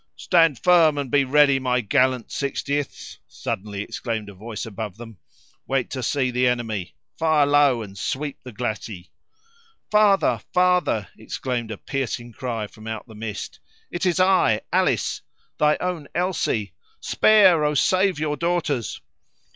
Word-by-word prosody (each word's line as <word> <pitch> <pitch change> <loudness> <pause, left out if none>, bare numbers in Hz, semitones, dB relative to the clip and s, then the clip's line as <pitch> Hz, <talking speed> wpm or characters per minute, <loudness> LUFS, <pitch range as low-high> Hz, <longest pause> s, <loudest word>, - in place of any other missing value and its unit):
"Stand 165 -6 +3
firm, 170 -4 +4
and 140 -3 -3
be 145 -1 +4
ready, 140 0 +4
my 125 -1 +1
gallant 130 0 +1
Sixtieths!" 140 0 -3
suddenly 100 0 -5
exclaimed 110 -2 -4
a - - -10
voice 105 +2 -7
above 105 -2 -6
them; 115 -5 -11 0.5
"wait 135 -2 -1
to 130 - -4
see 130 +1 0
the 125 +1 +2
enemy, 115 -7 -2 0.2
fire 155 -3 +3
low 140 -5 +3
and 100 -2 -11
sweep 140 +8 -4
the 125 - -10
glacis." 110 -5 -5 0.9
"Father! 210 -2 +4
father!" 180 - +2
exclaimed 120 +1 -4
a 110 - -5
piercing 120 -3 -4
cry 115 -3 -4
from 110 +1 -13
out 110 -1 -5
the 110 - -13
mist: 105 -1 -6 0.3
"it 175 +2 -1
is 180 0 +1
I! 185 - +3
Alice! - - +1 0.4
thy 150 0 +3
own 180 -5 -3
Elsie! 170 - -1 0.3
Spare, 190 -7 +5
oh! 150 0 +1
save 185 +4 +2
your 150 -1 -2
daughters!" 165 -7 -1
130 Hz, 145 wpm, -23 LUFS, 110-155 Hz, 0.9 s, Spare